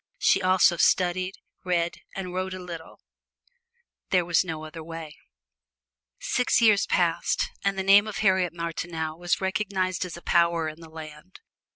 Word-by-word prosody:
She - - +3
also 185 -2 +4
studied, 185 +2 +2 0.3
read 175 -2 0 0.2
and 185 -2 -5
wrote 185 0 -3
a - - -7
little 170 -3 -9 1.1
there 180 -2 +2
was 170 0 +3
no 160 -3 -5
other 155 +1 -9
way! 165 -2 -8 1.0
Six 250 - +1
years 215 -4 +4
passed, 170 -2 +1
and 195 -1 0
the 190 - -1
name 200 +2 +6
of 215 - -5
Harriet 190 -4 +2
Martineau 165 -1 -4
was 175 +2 -1
recognized 190 -1 -1
as 180 -2 -7
a 170 - -13
power 170 -2 +2
in 155 +1 -7
the 165 -1 -12
land. 155 +2 -11
175 Hz, 155 wpm, -26 LUFS, 165-190 Hz, 1.1 s, name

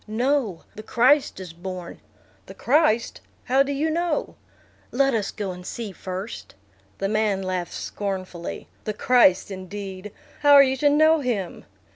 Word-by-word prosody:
"No, 230 - 0
the 215 - -9
Christ 250 +3 +2
is 180 -3 -8
born." 180 0 -7 0.5
"The - - -11
Christ! 255 -4 +1 0.2
How 265 +2 +3
do 280 +1 0
you 300 +3 0
know?" 335 -1 -1 0.6
"Let 275 +1 +2
us 215 -3 0
go 200 -3 -4
and 180 0 -9
see 220 +2 -6
first." 190 - -7 0.4
The 195 - -1
man 210 -2 0
laughed 185 -2 -3
scornfully. 185 -4 -5 0.2
"The 215 - -3
Christ 210 -6 +4
indeed! 195 +1 -7 0.3
How 290 -1 +5
are 280 -1 +10
you 265 -1 +1
to 290 +2 +3
know 310 +2 +4
him?" 225 -10 -3
215 Hz, 150 wpm, -24 LUFS, 190-275 Hz, 0.6 s, are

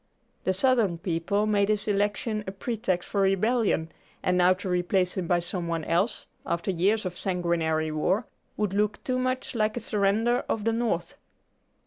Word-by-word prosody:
The 190 - +2
Southern 220 -4 +2
people 170 +4 0
made 205 -1 +2
his 210 -1 0
election 210 +1 0
a - - -2
pretext 195 -3 -2
for 200 - 0
rebellion, 195 -3 +2 0.3
and 180 - +2
now 180 0 +5
to 195 +1 -7
replace 180 0 +1
him 185 -3 -2
by 175 - +3
some 175 0 -4
one 165 -1 -2
else, 175 +9 0 0.2
after 170 +3 -1
years 195 +5 +1
of 180 -1 -5
sanguinary 165 -4 0
war, 185 +9 +1 0.3
would 210 -3 0
look 210 +1 0
too 255 -1 0
much 255 0 -1
like 215 -1 0
a - - 0
surrender 220 +3 +1
of 215 - -1
the 225 +1 +1
North. 225 -8 -1
195 Hz, 170 wpm, -27 LUFS, 175-215 Hz, 0.3 s, now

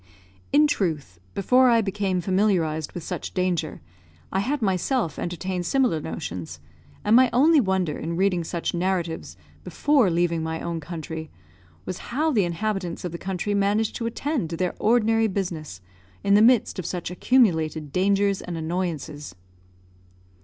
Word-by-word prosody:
In 295 +2 +6
truth, 160 - -2 0.2
before 250 +6 +4
I 230 -1 +4
became 195 -3 -1
familiarised 175 -5 0
with 175 - -6
such - - -5
danger, 180 -3 -1 0.5
I 190 - 0
had 275 +9 -1
myself 195 - 0
entertained 175 0 -3
similar 250 - +2
notions, 90 - -6 0.4
and 210 +2 +4
my 255 0 +6
only 305 +5 +5
wonder, 190 - 0
in 165 +2 -3
reading 185 -1 +1
such 170 +1 -3
narratives 175 -2 -2 0.3
before 280 -9 +2
leaving 170 -1 +1
my 160 0 -3
own 170 -1 -3
country, 160 0 -6 0.6
was 185 - -5
how 310 +6 +1
the 210 -9 +2
inhabitants 180 0 -3
of 175 - -3
the 170 - -6
country 190 +2 -2
managed 205 +2 +1
to 230 - -2
attend 240 - -2
to 165 - -4
their 180 +1 -1
ordinary 225 0 +3
business 170 - -4 0.4
in 200 - +3
the 205 - +6
midst 235 -3 +4
of 180 - -4
such 175 -1 -4
accumulated 160 - +2
dangers 195 +3 +2
and 175 -2 -5
annoyances. 160 - -4
185 Hz, 150 wpm, -24 LUFS, 165-215 Hz, 0.6 s, In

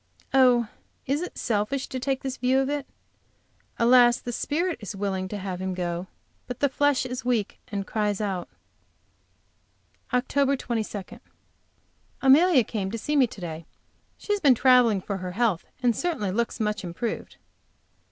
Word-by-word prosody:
Oh, 250 -3 +5 0.4
is 280 +4 0
it 360 - -6
selfish 230 +4 -1
to 260 - -4
take 265 +1 -2
this 265 -1 -3
view 255 +1 +2
of 270 +1 +1
it? 290 -2 -3 0.9
Alas, 240 0 +6
the 245 - -5
spirit 335 +8 -1
is 205 -1 -7
willing 190 -1 -2
to 210 - -5
have 185 -2 -5
him 190 -1 -2
go, 175 0 -3 0.4
but 250 - -6
the 285 - +2
flesh 285 -1 +2
is 255 0 -5
weak, 240 -5 -1
and 200 -2 -4
cries 210 -2 -1
out. 195 -4 -3 1.6
OCT. 275 +2 +1
22. 220 -5 -4 1.0
Amelia 280 +1 +6
came 205 -3 -3
to 230 - -4
see 295 +7 -2
me 270 -4 +5
to 215 - -12
day. 165 -1 -6 0.5
She 415 - -2
has 410 - 0
been 280 -8 +5
traveling, 245 -5 +5
for 200 +1 -4
her 180 -1 -5
health, 210 -5 0 0.2
and 240 -2 +3
certainly 290 - -1
looks 235 +4 -1
much 210 -2 -1
improved. 180 +6 -5
235 Hz, 160 wpm, -26 LUFS, 200-265 Hz, 1.6 s, Alas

